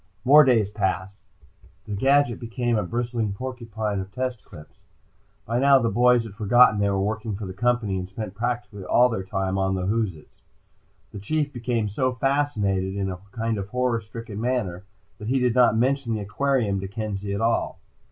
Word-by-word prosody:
More 150 +4 +8
days 115 -7 +3
passed. 95 -1 -2 0.7
The 105 - -6
gadget 135 +2 +2
became 120 0 -2
a 105 - +1
bristling 115 +1 -2
porcupine 110 -3 -4
of 95 +1 -6
test 125 -1 -3
clips. 75 - -14 0.7
By 115 +2 -1
now 140 +1 +6
the 115 -3 0
boys 120 +2 +4
had 110 -3 -9
forgotten 110 +1 +4
they 100 0 +2
were 100 -1 0
working 105 +1 -2
for 105 +1 -6
the 95 - -6
Company 115 -2 0
and 90 0 -6
spent 100 0 -6
practically 115 -3 -4
all 125 +6 +4
their 115 -5 -2
time 95 0 -2
on 95 0 +1
the 90 -1 -2
whoozits. 100 -6 -3 0.7
The 100 - -7
Chief 150 +7 -1
became 120 -3 -1
so 130 +5 -1
fascinated, 110 -8 0
in 95 -1 -2
a 90 - -5
kind 115 -2 -2
of 95 - -5
horror 125 0 0
stricken 110 -1 -8
manner, 110 -7 -2 0.3
that 105 - -7
he 130 +3 +1
did 125 -2 +2
not 120 -3 +4
mention 125 -1 +1
the 105 - -3
aquarium 105 -1 0
to 95 - -5
Kenzie 100 -1 -4
at - - -3
all. 115 +1 0
110 Hz, 185 wpm, -24 LUFS, 100-125 Hz, 0.7 s, More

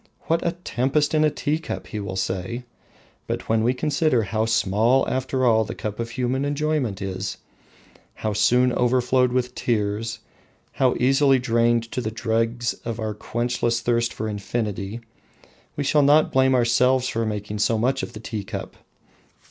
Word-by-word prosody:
What 165 +1 0
a 170 - 0
tempest 145 -3 0
in 155 0 +3
a 155 - +4
tea 150 +1 -1
cup! 160 - -6
he 110 - -6
will 100 -2 -5
say. 95 +5 -3 0.6
But - - -4
when 110 0 +2
we 125 +3 +2
consider 150 -3 +1
how 110 +2 -1
small 110 +4 +2
after 130 0 -1
all 110 -2 +4
the 105 - -6
cup 105 0 -5
of 115 0 -3
human 125 +3 -1
enjoyment 145 -8 -1
is, 95 0 -4 0.8
how 110 -1 -2
soon 125 +4 +3
overflowed 125 +1 +2
with 125 0 -1
tears, 110 -1 -1 0.5
how 130 -2 +2
easily 135 +2 +4
drained 115 -1 +1
to 125 - -2
the 110 - -2
dregs 115 +1 -1
in 115 -1 -4
our 110 -1 -2
quenchless 120 +2 -1
thirst 120 0 +1
for 110 - -4
infinity, 105 0 -3 0.7
we 145 - -2
shall 145 +2 +3
not 145 +2 +4
blame 130 0 +4
ourselves 125 +2 +3
for 115 -2 -1
making 105 -1 -4
so 115 +2 +2
much 130 +4 +1
of - - -6
the 105 - -8
tea 110 -2 -5
cup. - - -7
120 Hz, 165 wpm, -23 LUFS, 110-130 Hz, 0.8 s, a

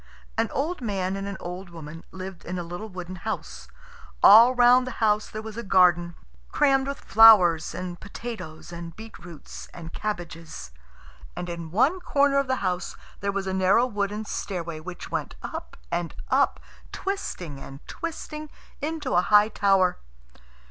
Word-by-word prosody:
An - - +1
old 315 +5 -2
man 195 -4 -1
and 195 0 -4
an 200 -1 -5
old 180 +1 -7
woman 165 -1 -9
lived 190 -1 -8
in 180 +1 -4
a 175 - -3
little 175 +6 -7
wooden 185 -1 -7
house. 170 - -5 0.6
All 235 +4 +9
round 250 +1 +6
the - - -4
house 210 -1 +2
there 215 0 -6
was 220 0 -8
a - - -2
garden, 175 -4 +3 0.4
crammed 270 -1 +3
with 280 - -4
flowers, 195 -7 +6
and 180 -1 -5
potatoes, 190 -8 -8
and 170 -1 -8
beetroots, 175 -7 -10
and 165 -1 -9
cabbages. 165 - -5 0.6
And 175 - -5
in 170 -1 -6
one 260 - +2
corner 280 -4 +2
of 275 - -1
the 260 - +1
house 180 0 -2 0.2
there 200 0 -1
was 195 0 -3
a 190 - -2
narrow 190 +6 +4
wooden 210 -2 -2
stairway 170 -6 -4
which 175 +2 -8
went - - -3
up - - -7
and 175 -1 -2
up, - - +2 0.3
twisting 180 - -4
and 135 0 -11
twisting, 310 -2 -6 0.3
into 300 -2 -3
a 175 - +5
high 210 +3 +5
tower. 195 -4 +2
195 Hz, 160 wpm, -26 LUFS, 175-230 Hz, 0.6 s, All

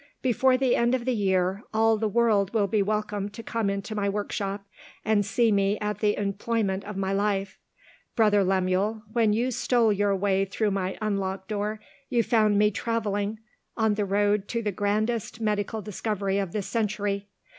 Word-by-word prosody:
Before 255 +1 +3
the 260 -1 +2
end 240 +2 +2
of 245 -2 -4
the 255 - +1
year, 190 -2 +1
all 225 0 +4
the 220 0 -1
world 215 -2 +2
will 210 -2 +3
be 205 +1 +1
welcome 210 0 -1
to 225 +3 -10
come 225 -2 -1
into 200 +2 -3
my 205 -1 0
workshop, 200 0 -3 0.4
and 215 -1 +3
see 220 +3 +2
me 200 0 +2
at 210 -1 -3
the 210 -1 +1
employment 200 0 -1
of 210 -1 -6
my 195 0 -1
life. 195 -1 -1 0.6
Brother 210 -3 +4
Lemuel, 190 +3 0
when 225 -3 +3
you 240 +5 +1
stole 235 -2 +2
your 200 0 +1
way 195 0 +1
through 205 +2 -1
my 190 -1 -2
unlocked 195 -2 -2
door, 210 +1 -2 0.3
you 235 -2 +2
found 215 -2 +3
me 210 +1 +4
travelling 215 -1 -2 0.4
on 220 -1 +2
the 205 0 -1
road 205 +1 +1
to 230 -1 -2
the 210 - 0
grandest 215 +3 -1
medical 210 0 -1
discovery 200 -1 -2
of 195 -3 -2
this 205 0 -3
century. 205 -3 -1
205 Hz, 175 wpm, -26 LUFS, 200-220 Hz, 0.6 s, all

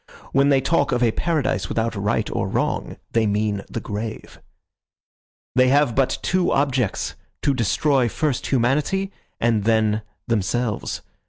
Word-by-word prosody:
When 140 +1 +4
they 135 -2 +4
talk 145 0 +1
of 125 0 +1
a 115 - +4
paradise 150 -1 -1
without 115 0 -1
right 100 +1 0
or - - -1
wrong, - - -2
they 115 -1 +2
mean 105 0 0
the - - -3
grave. 110 +1 -6 1.1
"They 130 0 +4
have 140 -1 +3
but 130 +2 +1
two 185 -1 +1
objects, 130 -6 0 0.3
to 140 - +3
destroy 130 +1 +2
first 145 +1 -1
humanity 150 +10 +1 0.3
and 115 -3 +2
then 110 -1 +2 0.3
themselves. 115 0 -1
120 Hz, 140 wpm, -22 LUFS, 110-140 Hz, 1.1 s, When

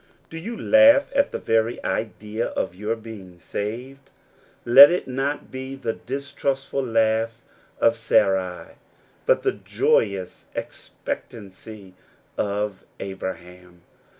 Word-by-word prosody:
Do 165 - -6
you 225 +7 -6
laugh 275 +1 +6
at 280 0 +2
the - - -3
very 115 +1 +1
idea 110 +1 -3
of - - -3
your 105 +5 -2
being 105 -6 -11
saved? 125 +10 -6 0.6
Let 135 +4 +10
it 180 - -1
not 135 +3 -3
be 130 +1 -6
the 115 -4 -3
distrustful 140 0 -3
laugh 115 0 0 0.4
of 115 0 +4
Sarai, 95 -5 0 0.5
but - - +3
the - - +2
joyous 95 -4 -1
expectancy 100 -2 -8 0.4
of 105 -1 -2 0.2
Abraham. 90 -2 -8
115 Hz, 110 wpm, -23 LUFS, 100-135 Hz, 0.6 s, Let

